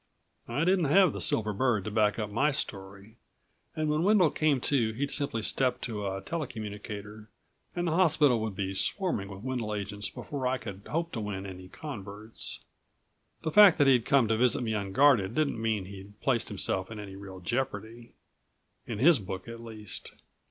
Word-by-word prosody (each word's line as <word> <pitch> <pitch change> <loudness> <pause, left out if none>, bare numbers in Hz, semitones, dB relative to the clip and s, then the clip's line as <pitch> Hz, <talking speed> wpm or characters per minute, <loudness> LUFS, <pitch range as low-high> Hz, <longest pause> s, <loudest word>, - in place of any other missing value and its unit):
I 135 +7 -1
didn't 180 -1 +3
have 170 +3 +5
the - - -5
silver 110 -1 +1
bird 115 -2 +1
to 110 - -4
back 105 -1 +2
up 105 -2 -3
my 135 +8 +2
story, 100 -5 -5 0.6
and 155 -1 -1
when 150 +1 +1
Wendel 190 -3 +4
came 150 -4 +2
to 120 -6 +1
he'd 140 +5 -2
simply 140 -6 -1
step 130 +4 0
to 105 -4 -3
a 95 0 -3
tele 155 +6 -3
communicator 105 -2 -7 0.5
and 175 0 -1
the 165 - 0
hospital 155 -8 +4
would 110 -3 -3
be 95 0 -2
swarming 105 - -1
with 100 +1 -9
Wendel 120 -5 -2
agents 100 0 -4
before 135 -3 -4
I 130 +1 +1
could 100 -4 -9
hope 170 +2 -1
to - - -4
win 100 -2 -4
any 95 -1 -8
converts. 105 - -7 0.8
The 160 - -1
fact 205 -3 +8
that 145 - +4
he'd 125 -4 +4
come 135 -4 +4
to 110 - +2
visit 125 +1 +3
me 110 -2 -1
unguarded 105 +1 +3
didn't 150 -7 0
mean 110 -4 0
he'd 100 +2 -11
placed 125 -4 +1
himself 95 -2 -2
in 110 - -7
any 100 -2 -8
real 95 -1 -9
jeopardy... 115 +2 -4 0.7
in 115 - -4
his 145 +6 +5
book 95 0 -6
at 115 0 -8
least. 110 -4 -8
110 Hz, 185 wpm, -29 LUFS, 100-140 Hz, 0.8 s, fact